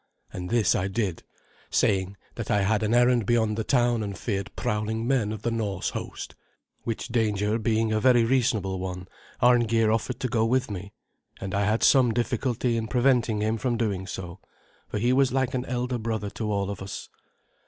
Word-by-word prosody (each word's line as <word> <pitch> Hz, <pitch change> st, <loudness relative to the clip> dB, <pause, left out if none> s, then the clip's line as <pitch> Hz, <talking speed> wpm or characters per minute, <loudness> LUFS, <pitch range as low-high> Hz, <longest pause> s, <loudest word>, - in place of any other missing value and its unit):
And 90 Hz, 0 st, -5 dB
this 110 Hz, -6 st, +3 dB
I 95 Hz, -, 0 dB
did, 100 Hz, -4 st, -2 dB, 0.5 s
saying 95 Hz, -1 st, +1 dB, 0.2 s
that 115 Hz, -, -6 dB
I 105 Hz, -1 st, +2 dB
had 105 Hz, +2 st, +1 dB
an 110 Hz, 0 st, 0 dB
errand 120 Hz, -2 st, +3 dB
beyond 110 Hz, -3 st, +2 dB
the 110 Hz, -, -2 dB
town 120 Hz, -1 st, +2 dB
and 100 Hz, -3 st, -4 dB
feared 100 Hz, -2 st, -3 dB
prowling 110 Hz, -1 st, -2 dB
men 125 Hz, -6 st, +1 dB
of 110 Hz, -1 st, -6 dB
the 120 Hz, -, 0 dB
Norse 105 Hz, -5 st, -2 dB
host. -, -, -6 dB, 0.5 s
Which 115 Hz, +1 st, -4 dB
danger 110 Hz, -2 st, +1 dB
being 110 Hz, 0 st, +1 dB
a 110 Hz, -, +2 dB
very 120 Hz, 0 st, +4 dB
reasonable 115 Hz, -7 st, +1 dB
one, 90 Hz, 0 st, -5 dB, 0.4 s
Arngeir 115 Hz, -2 st, +4 dB
offered 115 Hz, +3 st, -1 dB
to 130 Hz, -, 0 dB
go 115 Hz, -2 st, +1 dB
with 125 Hz, +1 st, +1 dB
me; 100 Hz, +1 st, -6 dB, 0.5 s
and 95 Hz, -1 st, -5 dB
I 100 Hz, 0 st, +1 dB
had 110 Hz, +2 st, +1 dB
some 125 Hz, -5 st, +5 dB
difficulty 120 Hz, 0 st, 0 dB
in 110 Hz, -1 st, -2 dB
preventing 120 Hz, -3 st, +2 dB
him 110 Hz, +1 st, 0 dB
from 120 Hz, -1 st, 0 dB
doing 100 Hz, -5 st, -1 dB
so, 90 Hz, -1 st, -7 dB, 0.5 s
for -, -, -4 dB
he 120 Hz, +4 st, +2 dB
was 135 Hz, 0 st, +3 dB
like 130 Hz, 0 st, 0 dB
an 130 Hz, 0 st, -2 dB
elder 125 Hz, 0 st, -2 dB
brother 110 Hz, -3 st, -3 dB
to 110 Hz, -2 st, -3 dB
all 100 Hz, -1 st, -1 dB
of 100 Hz, -, -7 dB
us. 95 Hz, +1 st, -6 dB
110 Hz, 190 wpm, -26 LUFS, 100-120 Hz, 0.5 s, some